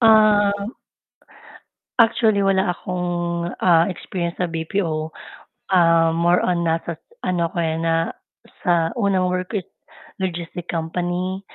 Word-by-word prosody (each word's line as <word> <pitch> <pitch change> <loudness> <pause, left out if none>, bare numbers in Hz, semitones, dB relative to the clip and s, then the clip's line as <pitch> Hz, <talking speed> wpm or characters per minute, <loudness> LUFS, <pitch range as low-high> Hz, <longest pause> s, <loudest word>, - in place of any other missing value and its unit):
Um. 210 -2 +4 1.3
Actually, 220 -3 +4
wala 190 -2 +2
akong, 175 -1 -2
ah, 170 -1 +4
experience 175 -1 -4
sa 180 - -1
BPO, 160 -1 -2 0.7
ah, 165 -2 +5
more 170 +2 +3
on 175 -1 +1
nasa 165 0 -1
s 160 - -16 0.2
ano 175 -2 0
ako, - - -9
eh, 165 -2 +1
na 165 0 0 0.5
sa 170 -2 +2
unang 200 -5 +1
work 180 0 -2
ko 220 - -1
is - - -37 0.5
logistic 175 -1 -4
company, 175 +3 -2
175 Hz, 125 wpm, -21 LUFS, 165-190 Hz, 1.3 s, ah